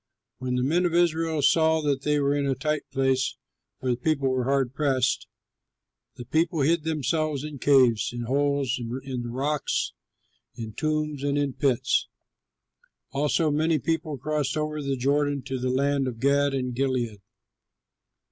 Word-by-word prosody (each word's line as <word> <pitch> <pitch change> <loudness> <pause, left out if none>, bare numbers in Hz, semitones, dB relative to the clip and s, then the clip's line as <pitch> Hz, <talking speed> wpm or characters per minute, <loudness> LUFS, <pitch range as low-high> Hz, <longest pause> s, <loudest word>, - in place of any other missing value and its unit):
When 125 0 -2
the 125 - 0
men 170 +6 +2
of 170 - -2
Israel 165 -3 +2
saw 160 +3 +4
that 140 -2 0
they 150 0 +1
were 140 0 +2
in 145 -1 0
a 135 - +1
tight 150 +3 -2
place 130 -1 +1 0.4
(for 130 - -1
the - - +2
people 140 +1 0
were 130 -1 0
hard 135 -2 +1
pressed), 135 -3 +1 0.9
the 120 - -8
people 160 +1 +1
hid 160 +4 +3
themselves 155 -1 -1
in 150 -2 -7
caves, 130 -6 +4
in 120 0 -5
holes, 140 0 0
in 125 +2 -4
the 120 - -5
rocks, 140 +5 -1 0.6
in 110 -2 -7
tombs, 155 0 -2
and 145 0 0
in 145 -2 0
pits. 130 -3 +1 1.0
Also 150 +3 +1
many 155 +2 +2
people 155 0 -2
crossed 150 +3 -1
over 155 0 -2
the 140 -1 -2
Jordan 140 +1 +1
to 130 0 -4
the 130 +1 -1
land 140 +1 +1
of 120 -3 -5
Gad 140 +1 +2
and 125 -2 -2
Gilead. 120 -5 -1
140 Hz, 160 wpm, -26 LUFS, 130-150 Hz, 1.0 s, saw